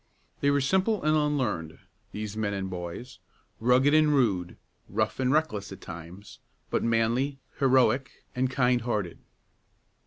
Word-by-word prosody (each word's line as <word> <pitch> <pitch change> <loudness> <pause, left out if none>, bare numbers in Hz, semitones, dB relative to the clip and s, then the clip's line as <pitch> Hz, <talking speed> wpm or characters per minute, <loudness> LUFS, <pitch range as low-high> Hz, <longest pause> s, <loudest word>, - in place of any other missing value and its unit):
They 140 - +2
were 140 0 +2
simple 190 +7 +1
and 155 0 +3
unlearned, 130 - -1 0.3
these 105 0 -5
men 105 -2 -1
and 95 -1 -4
boys, 90 +8 -7 0.4
rugged 125 +5 +4
and 155 -1 +5
rude, 95 -10 +1 0.3
rough 110 +4 -1
and 130 -1 +2
reckless 135 -10 0
at - - -9
times, 85 +4 -10 0.3
but - - +1
manly, 115 +5 +1 0.2
heroic, 130 -1 +3 0.3
and 130 0 +1
kindhearted. 120 -7 0
125 Hz, 130 wpm, -27 LUFS, 100-140 Hz, 0.4 s, and